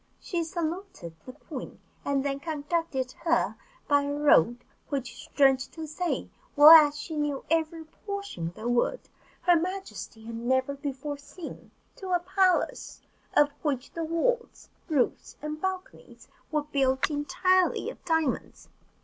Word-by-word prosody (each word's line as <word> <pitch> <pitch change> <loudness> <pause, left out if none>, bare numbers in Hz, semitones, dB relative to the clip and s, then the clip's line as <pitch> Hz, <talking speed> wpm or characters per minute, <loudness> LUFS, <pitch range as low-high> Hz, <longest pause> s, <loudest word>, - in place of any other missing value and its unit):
She 345 -2 -2
saluted 330 - -5
the 255 - -7
queen, - - -9 0.2
and 280 -1 0
then 275 0 -1
conducted 295 -3 -2
her 335 -1 +2 0.3
by 285 -1 +4
a 285 0 -2
road 245 - +3 0.2
which, 270 -4 -3
strange 270 -2 +3
to 320 -1 -6
say, 330 +3 -2 0.3
well 295 +1 +10
as 300 -2 +9
she 320 - -6
knew 295 -2 -2
every 325 0 0
portion 400 - -6
of 170 - -8
the 225 - -5
wood, 245 - +1 0.4
her 355 -1 +5
majesty 360 - -4
had 230 - -7
never 260 +3 +1
before 280 0 -5
seen, 325 +3 -10 0.3
to 375 -2 -4
a 355 - +4
palace 370 +1 +1 0.4
of 295 0 +5
which 275 -4 -2
the 335 - -4
walls, 465 +10 -1 0.2
roofs, 285 -6 0
and 305 +1 -5
balconies 380 -1 -5 0.2
were 305 -1 +1
built 270 -2 +1
entirely 365 +5 +1
of - - -16
diamonds. 320 -5 -1
300 Hz, 140 wpm, -28 LUFS, 275-340 Hz, 0.4 s, well